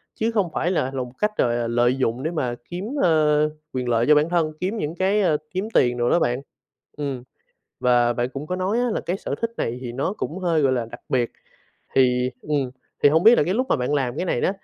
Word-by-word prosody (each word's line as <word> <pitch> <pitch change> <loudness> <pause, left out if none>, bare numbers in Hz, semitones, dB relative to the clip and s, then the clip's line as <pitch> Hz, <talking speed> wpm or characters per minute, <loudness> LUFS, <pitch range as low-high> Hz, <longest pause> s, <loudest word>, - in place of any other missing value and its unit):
chứ 225 +1 0
không 205 -6 +1
phải 175 - 0
là 135 -7 0
lòng 125 -2 -4
cách 210 0 -1
gọi 120 -1 +2
là 120 -1 -1
lợi 120 +2 +2
dụng 130 0 -1
để 160 - -1
mà 125 -7 -2
kiếm, 180 +3 -5 0.2
ờ, 150 -2 +3 0.2
quyền 125 -1 -2
lợi 115 0 +2
cho 150 - +7
bản 150 +3 +3
thân, 165 -3 +1
kiếm 195 +5 -2
những 160 -4 -3
cái, 195 +3 +2
ờ, 160 -5 +3
kiếm 190 +4 -2
tiền 120 -1 +3
đồ 120 0 +1
đó - - +4
bạn. 125 -4 0 0.6
Ừm, 140 -4 -4 0.6
và 120 -1 +3
bạn 120 +1 -1
cũng 140 +2 -6
có 180 - -2
nói 190 +6 0
á, 245 - +1
là - - -1
cái 180 +2 -2
sở - - -4
thích 230 0 -1
này 115 +2 -2
thì 120 - -5
nó 135 +10 -2
cũng 175 - -4
hơi, 170 -4 +1
gọi 135 -2 +3
là, 120 -2 -1
đặc - - -10
biệt, 125 -3 +1 0.6
thì, 125 -1 +3
ừm, 140 -4 -1 0.3
thì - - +8
hông 160 +3 +3
biết 230 +4 +8
là - - +5
cái 185 +5 0
lúc 255 +3 0
mà - - +3
bạn 125 +3 -1
làm 130 -3 -1
cái 180 - -1
này 120 - 0
đó, - - +2
150 Hz, 255 wpm, -23 LUFS, 125-180 Hz, 0.6 s, thì